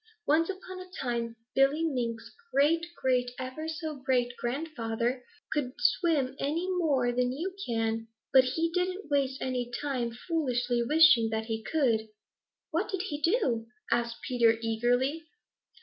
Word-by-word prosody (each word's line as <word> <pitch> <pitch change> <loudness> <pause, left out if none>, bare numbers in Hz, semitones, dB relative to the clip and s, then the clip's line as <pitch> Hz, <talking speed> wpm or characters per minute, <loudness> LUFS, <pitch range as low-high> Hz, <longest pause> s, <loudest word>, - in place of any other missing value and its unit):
Once 320 +4 +3
upon 375 -1 -6
a 370 0 -10
time 235 -2 -2 0.2
Billy 275 +4 +3
Mink's 235 -6 -2 0.2
great 325 +5 +3
great 250 -1 +2
ever 260 +5 -5
so 315 -2 -4
great 245 -2 +1
grandfather 245 -3 -2 0.3
couldn't 270 -4 -2
swim 295 -7 +2
any 320 +6 -1
more 275 -8 +2
than 250 0 +1
you 350 +8 -4
can, 225 -1 -1 0.3
but 260 -1 +8
he 320 +6 0
didn't 365 -2 -2
waste 270 -2 +1
any 250 -2 -2
time 250 -2 -2
foolishly 245 -3 -1
wishing 300 -3 +6
that 220 0 -2
he 225 -1 -3
could." 230 -6 +1 0.6
"What 340 +6 0
did 380 -2 -2
he 290 0 -4
do?" 275 - +1 0.2
asked 235 0 0
Peter 235 -3 +3
eagerly. 245 +8 +1
260 Hz, 140 wpm, -29 LUFS, 240-315 Hz, 0.6 s, but